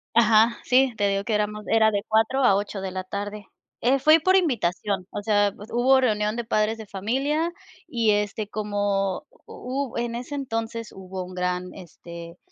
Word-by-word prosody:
Ajá, 230 Hz, 0 st, +5 dB
sí. 255 Hz, 0 st, +3 dB
Te 205 Hz, -1 st, +2 dB
digo 195 Hz, 0 st, 0 dB
que 225 Hz, -, -2 dB
éramos 210 Hz, 0 st, -1 dB
era 220 Hz, -1 st, +4 dB
de 200 Hz, -1 st, -1 dB
4 220 Hz, +5 st, +2 dB
a 200 Hz, -6 st, +5 dB
8 200 Hz, 0 st, -3 dB
de 190 Hz, -1 st, -4 dB
la 185 Hz, 0 st, -4 dB
tarde. 205 Hz, +2 st, -6 dB, 0.4 s
Eh, 260 Hz, +3 st, +3 dB
fui 310 Hz, +4 st, +6 dB
por 370 Hz, +4 st, +3 dB
invitación, 205 Hz, -, 0 dB
o -, -, -4 dB
sea, 205 Hz, -1 st, +2 dB
pues, 210 Hz, +2 st, -12 dB
hubo 260 Hz, +2 st, +4 dB
reunión 210 Hz, -3 st, +1 dB
de 235 Hz, -, -3 dB
padres 220 Hz, 0 st, 0 dB
de 220 Hz, -, -9 dB
familia 270 Hz, -, -1 dB, 0.4 s
y, 230 Hz, -3 st, 0 dB
este, 210 Hz, 0 st, -1 dB
como 205 Hz, -2 st, -1 dB, 0.2 s
hu 260 Hz, 0 st, -5 dB
en 235 Hz, 0 st, -2 dB
ese 245 Hz, +4 st, -6 dB
entonces, 230 Hz, -4 st, -4 dB
hubo 185 Hz, -1 st, -7 dB
un 180 Hz, 0 st, -10 dB
gran, 180 Hz, 0 st, -2 dB
este, 170 Hz, -1 st, -11 dB
215 Hz, 180 wpm, -24 LUFS, 200-240 Hz, 0.4 s, fui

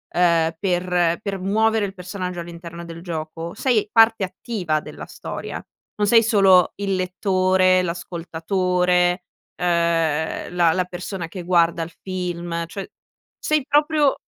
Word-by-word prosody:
ehm, 165 Hz, -2 st, +3 dB
per 180 Hz, -2 st, +1 dB
per 200 Hz, -2 st, -4 dB
muovere 220 Hz, +3 st, +2 dB
il 195 Hz, -, -6 dB
personaggio 180 Hz, -1 st, -5 dB
all'interno 170 Hz, 0 st, -8 dB
del 165 Hz, 0 st, -9 dB
gioco, 165 Hz, -1 st, -5 dB
sei 235 Hz, -6 st, +1 dB
parte 225 Hz, -2 st, +5 dB
attiva 185 Hz, -4 st, -2 dB
della -, -, -9 dB
storia, -, -, -7 dB, 0.3 s
non 205 Hz, -1 st, 0 dB
sei 230 Hz, +2 st, +6 dB
solo 195 Hz, -5 st, +5 dB
il 200 Hz, -1 st, -1 dB
lettore, 185 Hz, 0 st, +2 dB
l'ascoltatore, 180 Hz, +1 st, 0 dB, 0.3 s
ehm, 170 Hz, -1 st, 0 dB
la 170 Hz, -2 st, +4 dB
la 185 Hz, +1 st, +1 dB
persona 180 Hz, 0 st, -6 dB
che 175 Hz, +1 st, -8 dB
guarda 170 Hz, -1 st, +2 dB
il 165 Hz, -, -8 dB
film, 175 Hz, -2 st, -3 dB
cioè 195 Hz, +3 st, -7 dB, 0.5 s
sei 305 Hz, -3 st, 0 dB
proprio 295 Hz, -1 st, +3 dB
180 Hz, 130 wpm, -22 LUFS, 170-195 Hz, 0.5 s, sei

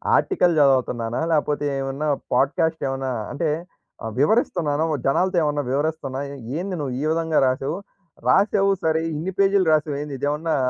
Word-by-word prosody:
Article 180 Hz, -, +2 dB
జదువుతున్నానా? 125 Hz, -4 st, +2 dB
లేకపోతే 150 Hz, -1 st, +1 dB
ఏమన్నా 135 Hz, +3 st, -3 dB, 0.3 s
podcast 160 Hz, +4 st, +1 dB
ఏమన్నా 135 Hz, 0 st, -2 dB, 0.2 s
అంటే 155 Hz, +1 st, -1 dB, 0.5 s
ఆహ్, 110 Hz, -1 st, -4 dB
వివరిస్తున్నానా 160 Hz, -, +2 dB
ఒ -, -, +1 dB
జనాలతో 180 Hz, +7 st, +2 dB
ఏమన్నా 145 Hz, -1 st, 0 dB
వివరిస్తున్నానా 140 Hz, -2 st, -2 dB, 0.4 s
ఏంది 185 Hz, +1 st, -3 dB
నువ్వు 135 Hz, -4 st, -3 dB
ఈ -, -, -2 dB
విధంగా 160 Hz, -1 st, 0 dB
రాసావు? 135 Hz, +6 st, -1 dB, 0.5 s
రాసావు 195 Hz, 0 st, +4 dB
సరే! 160 Hz, 0 st, +2 dB
ఇన్ని 170 Hz, +6 st, -3 dB
పేజీ‌లు 195 Hz, -2 st, +3 dB
రాసావేంది 145 Hz, -2 st, -1 dB
ఇదేమన్నా 150 Hz, +3 st, -1 dB
150 Hz, 135 wpm, -23 LUFS, 135-165 Hz, 0.5 s, రాసావు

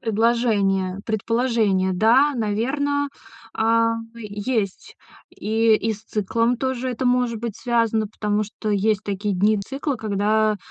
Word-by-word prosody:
предложение 210 Hz, -4 st, +1 dB
предположение. 220 Hz, -4 st, +1 dB
Да, 235 Hz, +9 st, +4 dB
наверно, 275 Hz, +7 st, 0 dB, 0.5 s
а, 230 Hz, +1 st, +2 dB, 0.2 s
есть. 210 Hz, -2 st, -4 dB, 0.3 s
И 220 Hz, +1 st, +2 dB
и 220 Hz, +1 st, -1 dB
с 210 Hz, -, -10 dB
циклом 230 Hz, +4 st, 0 dB
тоже 260 Hz, 0 st, -2 dB
это 250 Hz, +2 st, -4 dB
может 245 Hz, -3 st, +1 dB
быть 230 Hz, -4 st, -4 dB
связано, 230 Hz, -2 st, +1 dB
потому 210 Hz, 0 st, -1 dB
что, 215 Hz, +1 st, -5 dB
есть 210 Hz, 0 st, +1 dB
такие 200 Hz, 0 st, -2 dB
дни 210 Hz, +3 st, +2 dB
цикла, 270 Hz, +8 st, -3 dB
когда, 215 Hz, 0 st, +1 dB
220 Hz, 125 wpm, -22 LUFS, 205-235 Hz, 0.5 s, Да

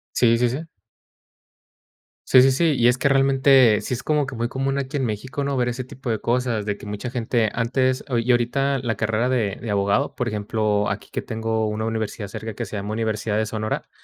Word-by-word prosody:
Sí, 115 Hz, -1 st, +4 dB
sí, 120 Hz, 0 st, +2 dB
sí. 130 Hz, +6 st, -3 dB, 1.7 s
Sí, 130 Hz, -, +7 dB
sí, 135 Hz, -, +5 dB
sí. 140 Hz, +6 st, +1 dB
Y 120 Hz, -, +4 dB
es 125 Hz, +1 st, +3 dB
que, 140 Hz, -, +2 dB
realmente, 135 Hz, -4 st, +5 dB
sí -, -, -4 dB
es 120 Hz, -, -7 dB
como 150 Hz, -2 st, +1 dB
que 130 Hz, -, -6 dB
muy 115 Hz, +1 st, -1 dB
común, 135 Hz, +2 st, -2 dB
aquí 140 Hz, +1 st, -4 dB
en 135 Hz, -3 st, 0 dB
México, 120 Hz, +6 st, -3 dB
¿no?, 140 Hz, -1 st, -1 dB
ver 125 Hz, -1 st, +1 dB
ese 125 Hz, +1 st, -4 dB
tipo 130 Hz, +1 st, -8 dB
de 110 Hz, -, -1 dB
cosas, 120 Hz, -3 st, 0 dB
de 105 Hz, -1 st, -2 dB
que -, -, -12 dB
mucha 105 Hz, +4 st, -5 dB
gente 120 Hz, -2 st, 0 dB
antes, 130 Hz, +2 st, 0 dB
ah 120 Hz, -3 st, 0 dB
Y 120 Hz, +2 st, +1 dB
ahorita 135 Hz, +3 st, +1 dB
la 120 Hz, -3 st, -2 dB
carrera 110 Hz, +3 st, 0 dB
de 115 Hz, -7 st, 0 dB
de 110 Hz, -, -4 dB
abogado, 100 Hz, +7 st, +1 dB
por 125 Hz, -, -2 dB
ejemplo, 105 Hz, -1 st, 0 dB
aquí -, -, -5 dB
que -, -, -3 dB
tengo 110 Hz, 0 st, -1 dB
una 105 Hz, +1 st, -2 dB
universidad 110 Hz, -2 st, -3 dB
cerca, 110 Hz, +2 st, -6 dB
que -, -, -4 dB
se -, -, -8 dB
llama 100 Hz, +2 st, -4 dB
Universidad 110 Hz, -1 st, -1 dB
de 110 Hz, -, +1 dB
Sonora, 110 Hz, 0 st, -3 dB
120 Hz, 220 wpm, -23 LUFS, 110-130 Hz, 1.7 s, Sí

